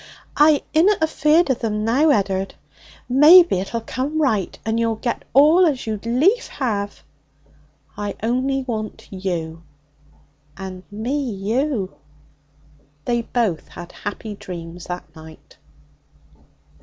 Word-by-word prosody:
'I 295 0 +4
inna 330 +1 +4
feared 310 0 +2
of 250 - -3
'em 210 -1 -1
now, 270 +8 +3
Ed'ard. 195 -5 0 0.5
Maybe 305 - +7
it'll 230 +5 -4
come 275 +7 -3
right, 220 - 0
and 225 +1 0
you'll 230 -1 +1
get 235 +2 -4
all 305 +7 +6
as 275 -5 -2
you'd 220 0 -4
lief 310 - +2
have.' 205 -6 -3 0.9
'I 205 0 -4
only 260 +4 0
want 220 -4 -5
you.' 170 -4 -4 1.0
'And 190 -1 -7
me 225 +8 -3
you.' 215 +1 -2 1.1
They 240 -1 0
both 225 -8 -1
had 175 0 -10
happy 205 +1 -6
dreams 175 -3 -9
that 180 0 -5
night. 160 0 -15
230 Hz, 120 wpm, -21 LUFS, 195-275 Hz, 1.1 s, Maybe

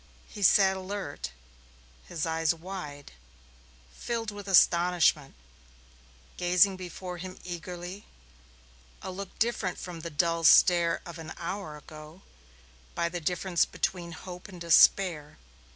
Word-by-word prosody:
He 205 - -11
sat 190 0 +5
alert, 185 - -5 0.8
his 165 -3 -3
eyes 160 0 +1
wide, 160 -5 -8 0.8
filled 230 - -4
with 205 -1 -9
astonishment, 170 -5 +3 1.0
gazing 180 +2 +4
before 180 0 -7
him 185 +1 -8
eagerly 175 +2 -7 1.0
a - - -5
look 195 +1 -8
different 225 -5 -1
from 175 -2 -7
the 170 +1 -6
dull 165 +2 0
stare 170 0 +5
of 170 -2 -9
an 160 - -8
hour 170 -3 -5
ago 155 +3 -13 0.7
by 170 - 0
the 175 0 -5
difference 175 +2 +1
between 170 -2 -3
hope 180 +1 -9
and 185 -3 -11
despair. 170 -2 +4
175 Hz, 120 wpm, -28 LUFS, 165-190 Hz, 1.0 s, sat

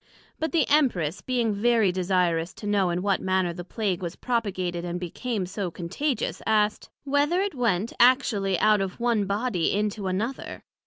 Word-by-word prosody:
But 320 - -1
the 335 - +2
Empress 200 - +2
being 240 -4 0
very 220 -1 +3
desirous 180 -2 0
to - - -9
know 200 -3 +2
in 175 +1 -1
what 200 -1 +1
manner 185 -2 +1
the 175 +1 -7
Plague 190 -1 -2
was 170 -2 -4
propagated, 185 -8 -2
and 175 0 -3
became 195 +4 -3
so 190 0 -4
contagious, 195 - -3
asked, 215 -1 +1
Whether 290 +5 +1
it 400 -2 -1
went 230 -5 0
actually 235 -7 +3
out 215 -2 +4
of 190 +2 -4
one 235 -4 +1
body 200 -3 0
into 210 -1 -1
another? 215 +8 -3
205 Hz, 165 wpm, -26 LUFS, 180-240 Hz, -, out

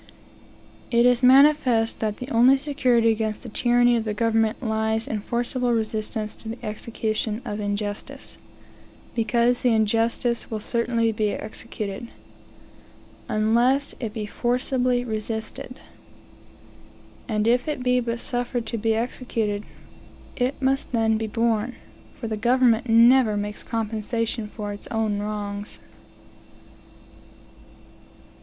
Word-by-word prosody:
It 235 0 +4
is 245 0 +4
manifest 260 -3 +5
that 215 -2 -2
the 250 - -7
only 245 +4 +6
security 255 -5 +2
against 220 -1 -2
the 240 - -7
tyranny 240 +2 +3
of 230 - 0
the 215 -1 -3
government 225 +1 +1
lies 220 0 0
in 215 - -2
forcible 245 +2 -1
resistance 215 -1 -2
to 220 - -8
the 230 - -7
execution 215 0 -2
of 205 - -4
the 205 - -3
injustice; 205 0 -4 0.7
because 235 +2 +2
the 245 -3 +3
injustice 225 +2 +1
will 220 - -3
certainly 230 +1 0
be 215 -1 0
executed, 215 0 -6 1.2
unless 240 +6 +2
it 230 -4 -3
be 215 -1 -4
forcibly 245 +2 0
resisted. 220 +2 -5 1.5
And 215 -1 0
if 245 +3 +2
it 295 -5 -2
be 250 0 +3
but 235 -1 -2
suffered 245 -1 -1
to 230 - -3
be 225 +1 +1
executed, 225 -3 -2 0.7
it 255 +1 -1
must 270 0 0
then 220 -1 +2
be 220 - -2
borne; 230 +1 0 0.4
for 230 - -6
the 220 -1 -3
government 240 0 +3
never 230 -1 +6
makes 205 0 -4
compensation 225 0 -2
for 210 -1 -6
its 205 - -9
own 220 -3 -1
wrongs. 205 0 -4
230 Hz, 125 wpm, -24 LUFS, 215-245 Hz, 1.5 s, only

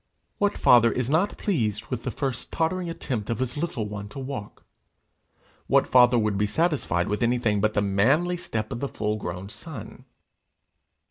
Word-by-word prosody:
What 205 0 +1
father 115 -1 +6
is 125 +1 -1
not 175 +7 +1
pleased 110 - -1
with 125 -2 -2
the 125 - -3
first 135 0 -3
tottering 170 +2 -1
attempt 125 -10 -4
of 115 - -1
his 130 -1 -2
little 145 -9 -2
one 105 0 -6
to 135 - -11
walk? 130 -6 -7 1.0
What - - +4
father 125 -1 +5
would 105 -3 +1
be 105 - +2
satisfied 145 - 0
with 105 - -2
anything 120 -4 +1
but 110 +1 +1
the 105 - +2
manly 135 - +2
step 110 -8 -4
of 120 - -4
the 140 - -3
full 105 0 -2
grown 90 -1 -5
son? 140 - -9
120 Hz, 175 wpm, -25 LUFS, 105-145 Hz, 1.0 s, father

